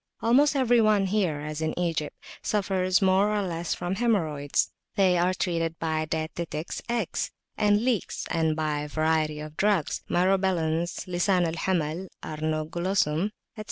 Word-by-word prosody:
Almost 275 Hz, +6 st, +4 dB
every 245 Hz, -3 st, +4 dB
one 210 Hz, -2 st, +3 dB
here, 185 Hz, -7 st, 0 dB
as 155 Hz, +1 st, -5 dB
in 160 Hz, 0 st, -2 dB
Egypt, 165 Hz, -4 st, -2 dB, 0.2 s
suffers 190 Hz, -2 st, +1 dB
more 190 Hz, +2 st, +4 dB
or 210 Hz, -1 st, 0 dB
less 170 Hz, -2 st, -2 dB
from 175 Hz, +2 st, -3 dB
haemorrhoids; 160 Hz, -12 st, +1 dB, 0.2 s
they 190 Hz, -3 st, +4 dB
are 175 Hz, +1 st, +3 dB
treated 165 Hz, -2 st, -1 dB
by 160 Hz, -1 st, -1 dB
dietetics 160 Hz, +1 st, -4 dB
eggs 235 Hz, -6 st, -1 dB, 0.3 s
and 210 Hz, +2 st, +2 dB
leeks 240 Hz, -8 st, -1 dB
and 160 Hz, -1 st, +1 dB
by 155 Hz, -1 st, -1 dB
a 150 Hz, -, -4 dB
variety 155 Hz, 0 st, 0 dB
of 155 Hz, 0 st, -8 dB
drugs, 200 Hz, -6 st, +1 dB
Myrobalans, 175 Hz, -3 st, +1 dB
Lisan 180 Hz, 0 st, +2 dB
al 165 Hz, -, -1 dB
Hamal 170 Hz, 0 st, -1 dB, 0.2 s
(Arnoglossum), 155 Hz, +2 st, -1 dB
etc. -, -, -1 dB
175 Hz, 145 wpm, -27 LUFS, 155-195 Hz, 0.3 s, Almost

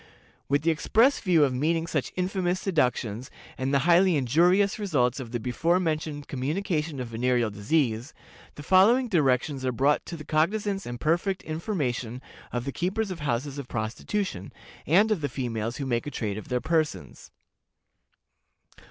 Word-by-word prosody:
"With 140 Hz, +1 st, +2 dB
the 165 Hz, -, +3 dB
express 225 Hz, -, +3 dB
view 175 Hz, -6 st, +3 dB
of 135 Hz, -3 st, +2 dB
meeting 160 Hz, +5 st, 0 dB
such 155 Hz, -5 st, -2 dB
infamous 185 Hz, -1 st, -1 dB
seductions, 125 Hz, -, -1 dB, 0.3 s
and 130 Hz, +1 st, -2 dB
the 140 Hz, -, +4 dB
highly 175 Hz, +1 st, +5 dB
injurious 175 Hz, -, +3 dB
results 140 Hz, -, +1 dB
of 125 Hz, -3 st, -6 dB
the 120 Hz, -, -2 dB
before 165 Hz, +9 st, +1 dB
mentioned 155 Hz, -4 st, -2 dB
communication 155 Hz, +2 st, -2 dB
of 125 Hz, -2 st, -5 dB
venereal 120 Hz, -1 st, 0 dB
disease, 115 Hz, +3 st, 0 dB, 0.4 s
the 145 Hz, -, -9 dB
following 225 Hz, -, +4 dB
directions 135 Hz, -, +1 dB
are 130 Hz, -, 0 dB
brought 135 Hz, +4 st, +2 dB
to 170 Hz, -, -6 dB
the 155 Hz, -, -10 dB
cognizance 195 Hz, +5 st, 0 dB
and 120 Hz, 0 st, -6 dB
perfect 175 Hz, -, 0 dB
information 140 Hz, -, -3 dB, 0.3 s
of 120 Hz, 0 st, -3 dB
the 140 Hz, -, -2 dB
keepers 195 Hz, +7 st, -2 dB
of 180 Hz, -, -6 dB
houses 140 Hz, 0 st, -2 dB
of 140 Hz, -, -7 dB
prostitution, 110 Hz, -, -3 dB, 0.4 s
and 200 Hz, +9 st, +4 dB
of 200 Hz, -7 st, +1 dB
the 145 Hz, -, -1 dB
females 120 Hz, -3 st, -3 dB
who 140 Hz, -, -3 dB
make 120 Hz, +1 st, -1 dB
a -, -, -1 dB
trade 105 Hz, -7 st, -3 dB
of -, -, -11 dB
their 125 Hz, -1 st, -1 dB
persons. 155 Hz, -1 st, -2 dB
150 Hz, 160 wpm, -26 LUFS, 125-180 Hz, 0.4 s, highly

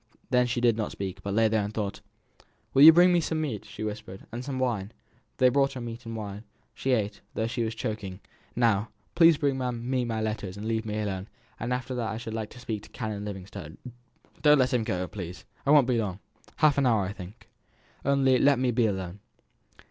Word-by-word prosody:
Then 125 Hz, -1 st, +4 dB
she 120 Hz, 0 st, -1 dB
did 120 Hz, -2 st, +4 dB
not 110 Hz, -, -2 dB
speak, 95 Hz, 0 st, -5 dB
but 100 Hz, 0 st, -3 dB
lay 115 Hz, 0 st, +4 dB
and 105 Hz, -2 st, +1 dB
thought. 105 Hz, -2 st, -3 dB, 0.7 s
"Will 135 Hz, -, +5 dB
you 155 Hz, +3 st, +12 dB
bring 175 Hz, +2 st, +6 dB
me 175 Hz, -, +4 dB
some 160 Hz, 0 st, -1 dB
meat?" 135 Hz, -10 st, -3 dB
she -, -, -7 dB
whispered. 105 Hz, -3 st, -6 dB
"And 120 Hz, +2 st, -5 dB
some 135 Hz, 0 st, -4 dB
wine?" 115 Hz, -5 st, -1 dB, 0.4 s
They 130 Hz, -1 st, +5 dB
brought 135 Hz, +1 st, +2 dB
her 130 Hz, -, -6 dB
meat 115 Hz, 0 st, -7 dB
and 115 Hz, -, -5 dB
wine; 105 Hz, -1 st, -6 dB, 0.3 s
she 135 Hz, -, 0 dB
ate, 105 Hz, -3 st, -1 dB
though 110 Hz, -, 0 dB
she 120 Hz, +1 st, -2 dB
was 110 Hz, 0 st, -3 dB
choking. 105 Hz, -4 st, -4 dB, 0.4 s
"Now, 115 Hz, -3 st, +2 dB, 0.2 s
please, 165 Hz, -2 st, +6 dB
bring 140 Hz, -3 st, 0 dB
me 125 Hz, 0 st, -1 dB
my 115 Hz, -2 st, -2 dB
letters, 105 Hz, -3 st, -3 dB
and 105 Hz, +2 st, -5 dB
leave 110 Hz, 0 st, -1 dB
me 105 Hz, 0 st, -2 dB
alone; 95 Hz, -2 st, -3 dB, 0.3 s
and 120 Hz, +2 st, -3 dB
after 125 Hz, +1 st, -2 dB
that 120 Hz, -3 st, -2 dB
I 110 Hz, -, -3 dB
should 115 Hz, -1 st, -6 dB
like 110 Hz, -1 st, -3 dB
to 125 Hz, -, -13 dB
speak 110 Hz, -4 st, -4 dB
to -, -, -15 dB
Canon 110 Hz, -4 st, -4 dB
Livingstone. 95 Hz, -6 st, -8 dB, 0.6 s
Don't 150 Hz, +1 st, +6 dB
let 130 Hz, -2 st, +2 dB
him 120 Hz, -2 st, +2 dB
go, 90 Hz, -3 st, -2 dB
please. 90 Hz, -2 st, -8 dB, 0.2 s
I -, -, +2 dB
won't 145 Hz, -3 st, +7 dB
be 125 Hz, -2 st, +1 dB
long 100 Hz, -5 st, -2 dB, 0.4 s
half 145 Hz, -2 st, +4 dB
an 135 Hz, -, +3 dB
hour, 110 Hz, -4 st, +3 dB
I 95 Hz, -, -4 dB
think. 95 Hz, +4 st, -11 dB, 0.6 s
Only 135 Hz, -2 st, +3 dB
let 140 Hz, -1 st, +5 dB
me 125 Hz, 0 st, +1 dB
be 120 Hz, -1 st, +3 dB
alone." 95 Hz, -1 st, -4 dB
115 Hz, 215 wpm, -28 LUFS, 105-130 Hz, 0.7 s, you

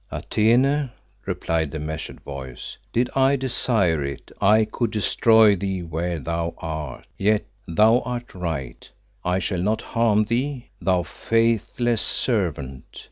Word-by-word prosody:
"Atene," 130 Hz, +6 st, +2 dB, 0.4 s
replied 80 Hz, -2 st, -1 dB
the 80 Hz, -, -5 dB
measured 80 Hz, +1 st, -6 dB
Voice, 65 Hz, -3 st, -8 dB, 0.2 s
"did 120 Hz, +2 st, +2 dB
I 135 Hz, +1 st, +4 dB
desire 110 Hz, -, +1 dB
it, 70 Hz, -1 st, -6 dB
I 110 Hz, +2 st, +5 dB
could 115 Hz, +2 st, -2 dB
destroy 110 Hz, 0 st, +4 dB
thee 95 Hz, -1 st, -3 dB
where 85 Hz, +1 st, -2 dB
thou 85 Hz, +3 st, -3 dB
art. 75 Hz, -6 st, -5 dB
Yet 105 Hz, +1 st, +2 dB, 0.2 s
thou 110 Hz, +8 st, +5 dB
art 120 Hz, -1 st, -5 dB
right, 80 Hz, -9 st, -5 dB, 0.3 s
I 90 Hz, +1 st, +1 dB
shall 95 Hz, -1 st, -1 dB
not 105 Hz, +4 st, 0 dB
harm 110 Hz, -2 st, +2 dB
thee, 125 Hz, +4 st, -2 dB
thou 90 Hz, -2 st, +2 dB
faithless 115 Hz, +3 st, 0 dB
servant. 80 Hz, -, -2 dB
100 Hz, 130 wpm, -23 LUFS, 80-115 Hz, 0.4 s, I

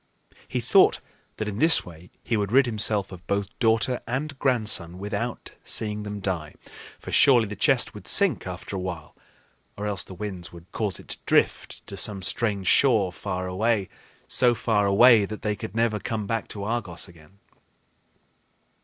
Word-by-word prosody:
He -, -, -2 dB
thought -, -, +4 dB, 0.4 s
that 110 Hz, -, -3 dB
in 105 Hz, 0 st, -4 dB
this 160 Hz, +3 st, +6 dB
way 85 Hz, 0 st, -13 dB
he 120 Hz, -, -1 dB
would 100 Hz, -1 st, -1 dB
rid 135 Hz, +2 st, +5 dB
himself 105 Hz, -4 st, 0 dB
of 90 Hz, -1 st, -12 dB
both 100 Hz, 0 st, -1 dB
daughter 115 Hz, +1 st, +1 dB
and 135 Hz, +3 st, -3 dB
grandson 105 Hz, -9 st, +1 dB
without 105 Hz, +5 st, -4 dB
seeing 105 Hz, -1 st, -1 dB
them 105 Hz, -1 st, -6 dB
die; 85 Hz, -6 st, -4 dB, 0.4 s
for -, -, -9 dB
surely 125 Hz, -5 st, +5 dB
the 105 Hz, -, -6 dB
chest 125 Hz, +5 st, +2 dB
would 105 Hz, -, -11 dB
sink 185 Hz, -, +3 dB
after 95 Hz, +2 st, -7 dB
a -, -, -2 dB
while, 90 Hz, -4 st, -6 dB, 0.6 s
or 105 Hz, -, -4 dB
else 100 Hz, -3 st, 0 dB
the 95 Hz, -, -11 dB
winds 95 Hz, -3 st, -6 dB
would 85 Hz, 0 st, -14 dB
cause 105 Hz, -4 st, -2 dB
it -, -, -15 dB
to -, -, -6 dB
drift -, -, 0 dB
to -, -, -7 dB
some 100 Hz, -3 st, 0 dB
strange 100 Hz, -2 st, -2 dB
shore 105 Hz, -5 st, +3 dB
so -, -, -16 dB, 1.4 s
far 105 Hz, -3 st, +1 dB
away 110 Hz, +2 st, +6 dB
that 110 Hz, +1 st, -8 dB
they 105 Hz, -1 st, 0 dB
could 95 Hz, +1 st, -8 dB
never 115 Hz, -2 st, +1 dB
come 110 Hz, +1 st, -4 dB
back 115 Hz, +2 st, -2 dB
to 100 Hz, -, -7 dB
Argos 105 Hz, -6 st, -2 dB
again. 85 Hz, +2 st, -18 dB
105 Hz, 170 wpm, -25 LUFS, 95-115 Hz, 1.4 s, this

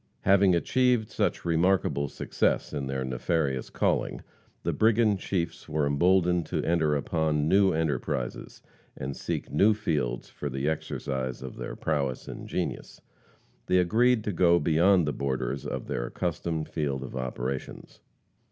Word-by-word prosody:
Having 95 Hz, -2 st, +5 dB
achieved 125 Hz, +4 st, +2 dB
such -, -, -1 dB
remarkable 85 Hz, -3 st, +2 dB
success -, -, -1 dB
in 70 Hz, -2 st, -3 dB
their 65 Hz, -1 st, -2 dB
nefarious 65 Hz, +1 st, -1 dB
calling, -, -, -1 dB, 0.4 s
the -, -, 0 dB
brigand 110 Hz, -2 st, +3 dB
chiefs 85 Hz, -4 st, -3 dB
were 75 Hz, -1 st, +1 dB
emboldened 90 Hz, +3 st, +2 dB
to -, -, -2 dB
enter 80 Hz, -3 st, +2 dB
upon 75 Hz, +1 st, 0 dB
new 95 Hz, +2 st, +4 dB
enterprises, 70 Hz, -6 st, -2 dB, 0.3 s
and 70 Hz, +1 st, -4 dB
seek -, -, -4 dB
new 105 Hz, +2 st, +4 dB
fields 75 Hz, -, -2 dB
for 75 Hz, -, -6 dB
the 65 Hz, +2 st, -2 dB
exercise 65 Hz, -4 st, -3 dB
of 65 Hz, -, -7 dB
their -, -, -6 dB
prowess 70 Hz, -5 st, -2 dB
and -, -, -7 dB
genius. -, -, -4 dB, 0.7 s
They 90 Hz, -, +3 dB
agreed 110 Hz, +6 st, +3 dB
to 105 Hz, -, -1 dB
go 85 Hz, 0 st, +4 dB
beyond 85 Hz, +2 st, +3 dB
the 75 Hz, -, 0 dB
borders 70 Hz, 0 st, -2 dB
of -, -, -4 dB
their -, -, -3 dB
accustomed 80 Hz, -2 st, -3 dB
field 70 Hz, -4 st, -2 dB
of 65 Hz, -, -8 dB
operations. 65 Hz, +1 st, -5 dB
80 Hz, 145 wpm, -27 LUFS, 70-90 Hz, 0.7 s, Having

